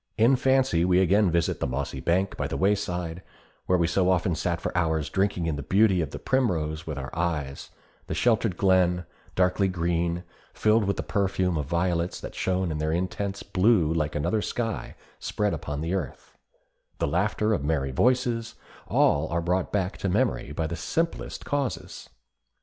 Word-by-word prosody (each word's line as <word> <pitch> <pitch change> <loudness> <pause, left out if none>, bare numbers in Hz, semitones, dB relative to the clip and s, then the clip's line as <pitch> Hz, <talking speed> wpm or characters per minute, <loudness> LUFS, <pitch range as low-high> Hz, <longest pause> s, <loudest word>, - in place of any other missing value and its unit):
In 115 +4 +5
fancy 130 -9 +2
we 90 0 +3
again 95 +2 +4
visit 85 0 0
the - - -1
mossy 65 +2 -3
bank 95 +3 0
by - - -2
the - - -3
wayside, 90 -3 0 0.5
where 90 - +4
we 85 - +2
so 90 +3 +2
often 95 0 +2
sat 85 +2 -1
for - - -4
hours 80 -3 0
drinking 95 -3 0
in 80 -3 -1
the - - -4
beauty 95 +4 +3
of 80 - -2
the - - -7
primrose 80 -12 0
with 75 -3 -4
our 65 +1 -6
eyes; 80 -5 -2 0.4
the - - -3
sheltered 110 -5 +2
glen, 90 -2 +3 0.3
darkly 90 +2 +2
green, 85 -1 -1 0.3
filled 110 0 +3
with 100 0 -1
the - - -2
perfume 95 -3 0
of 75 -3 -2
violets 85 +1 0
that - - -8
shone 95 -2 -1
in 75 - -3
their 80 +1 0
intense 95 +3 -2
blue 90 -5 +3
like 75 -2 -1
another 105 +9 0
sky 115 -1 -3 0.2
spread 105 -2 -1
upon 75 -1 -4
the 80 +3 -2
earth; 95 - -5 0.6
the - - 0
laughter 105 +7 +1
of 75 - -1
merry 70 -3 0
voices, 120 - +1 0.3
are - - -3
all 85 +1 +3
brought 90 +2 0
back 95 -2 -1
to 100 - -1
memory 65 -5 0
by 80 +2 -2
the 85 - -3
simplest 165 - -2
causes. 140 -4 -3
90 Hz, 180 wpm, -26 LUFS, 80-100 Hz, 0.6 s, In